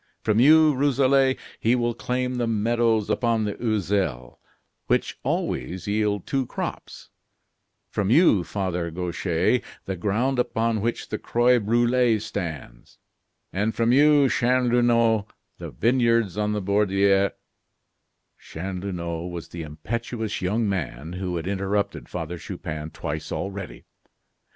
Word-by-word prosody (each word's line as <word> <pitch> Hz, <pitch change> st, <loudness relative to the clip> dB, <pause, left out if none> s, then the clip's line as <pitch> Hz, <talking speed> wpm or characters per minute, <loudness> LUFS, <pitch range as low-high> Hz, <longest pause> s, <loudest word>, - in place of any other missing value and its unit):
From 110 Hz, 0 st, +2 dB
you, 155 Hz, +3 st, +6 dB
Rousselet, 135 Hz, -1 st, +3 dB, 0.2 s
he 115 Hz, +3 st, +3 dB
will 120 Hz, -1 st, 0 dB
claim 125 Hz, +1 st, -2 dB
the 120 Hz, -, 0 dB
meadows 115 Hz, 0 st, +1 dB
upon 115 Hz, -2 st, +1 dB
the 105 Hz, -1 st, -2 dB
Oiselle, 95 Hz, -, -1 dB, 0.5 s
which -, -, 0 dB
always 90 Hz, +1 st, -2 dB
yield 105 Hz, -2 st, 0 dB
two 135 Hz, -2 st, -1 dB
crops; -, -, -6 dB, 0.8 s
from 100 Hz, -2 st, -1 dB
you, 125 Hz, -, +5 dB
Father 90 Hz, -1 st, -3 dB
Gauchais, 90 Hz, +5 st, 0 dB, 0.2 s
the 95 Hz, -, -3 dB
ground 115 Hz, +8 st, 0 dB
upon 115 Hz, -2 st, 0 dB
which 120 Hz, +2 st, -2 dB
the -, -, -3 dB
Croix 120 Hz, +1 st, +3 dB
Brulee 120 Hz, +2 st, +2 dB
stands; 85 Hz, -, -6 dB, 0.8 s
from 115 Hz, 0 st, +1 dB
you, 145 Hz, +1 st, +5 dB
Chanlouineau, 120 Hz, -3 st, +2 dB, 0.3 s
the -, -, -6 dB
vineyards 115 Hz, -, +2 dB
on 105 Hz, 0 st, 0 dB
the 105 Hz, -2 st, -2 dB
Borderie 100 Hz, 0 st, +3 dB, 0.6 s
" -, -, -52 dB
Chanlouineau 90 Hz, -1 st, -5 dB
was 85 Hz, -2 st, -7 dB
the 85 Hz, -, -7 dB
impetuous 110 Hz, +9 st, -4 dB
young 105 Hz, +5 st, 0 dB
man 80 Hz, -5 st, -3 dB
who 90 Hz, -1 st, -3 dB
had 85 Hz, -1 st, -3 dB
interrupted 100 Hz, +1 st, -2 dB
Father 85 Hz, 0 st, -5 dB
Chupin 75 Hz, -1 st, -6 dB
twice 80 Hz, -1 st, -5 dB
already. 100 Hz, -2 st, -5 dB
105 Hz, 120 wpm, -24 LUFS, 90-120 Hz, 0.8 s, you